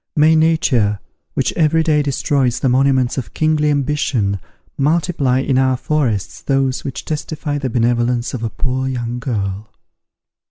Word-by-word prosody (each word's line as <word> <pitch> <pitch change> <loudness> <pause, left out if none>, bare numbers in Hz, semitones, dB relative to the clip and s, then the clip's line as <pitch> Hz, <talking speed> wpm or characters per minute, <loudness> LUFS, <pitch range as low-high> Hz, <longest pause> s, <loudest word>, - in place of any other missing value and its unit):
May 155 +1 +5
nature, 145 -10 +2 0.4
which 135 - 0
every 160 0 +2
day 155 -2 +2
destroys 135 -3 0
the 135 - +2
monuments 130 0 +2
of 125 - -9
kingly 155 -1 +2
ambition, 135 -8 0 0.4
multiply 150 -3 +1
in 135 -1 +1
our 130 -1 +2
forests 130 -7 -1
those 135 -1 0
which 135 - -6
testify 150 -1 -3
the 135 -2 -2
beneficence 120 0 0
of 125 - -4
a 115 - -2
poor 130 +2 -2
young 120 -2 -3
girl! 105 -5 -3
130 Hz, 145 wpm, -18 LUFS, 120-150 Hz, 0.4 s, May